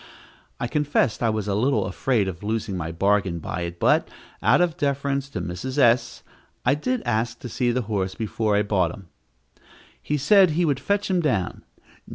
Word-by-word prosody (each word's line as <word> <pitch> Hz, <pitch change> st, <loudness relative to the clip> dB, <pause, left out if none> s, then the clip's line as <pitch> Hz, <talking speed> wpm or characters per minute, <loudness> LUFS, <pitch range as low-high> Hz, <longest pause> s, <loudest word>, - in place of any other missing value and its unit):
I -, -, -1 dB
confess 145 Hz, -3 st, 0 dB
I 115 Hz, -, +2 dB
was 110 Hz, -2 st, -2 dB
a 100 Hz, -, 0 dB
little 110 Hz, 0 st, +1 dB
afraid 100 Hz, +2 st, 0 dB
of 85 Hz, -3 st, -5 dB
losing 110 Hz, -1 st, -2 dB
my 85 Hz, -2 st, -4 dB
bargain 95 Hz, 0 st, +1 dB
by 85 Hz, +2 st, -5 dB
it, 85 Hz, 0 st, -5 dB
but, -, -, +3 dB, 0.3 s
out -, -, +4 dB
of 175 Hz, -3 st, +2 dB
deference 140 Hz, -1 st, -1 dB
to -, -, -4 dB
Mrs. 130 Hz, +11 st, -5 dB
S., 120 Hz, -2 st, +3 dB, 0.4 s
I 125 Hz, -, +4 dB
did 245 Hz, -, -2 dB
ask 115 Hz, +1 st, -1 dB
to -, -, -6 dB
see 120 Hz, +1 st, 0 dB
the 125 Hz, +1 st, -1 dB
horse 100 Hz, -3 st, -2 dB
before 110 Hz, -1 st, -1 dB
I 105 Hz, -, +3 dB
bought 95 Hz, -4 st, +1 dB
him. 95 Hz, -4 st, -15 dB, 0.9 s
He 150 Hz, -, -1 dB
said 185 Hz, +6 st, +5 dB
he 170 Hz, +3 st, +1 dB
would 140 Hz, -4 st, +1 dB
fetch 200 Hz, +8 st, 0 dB
him 185 Hz, -, +2 dB
down. 110 Hz, -, -1 dB
115 Hz, 190 wpm, -24 LUFS, 100-140 Hz, 0.9 s, said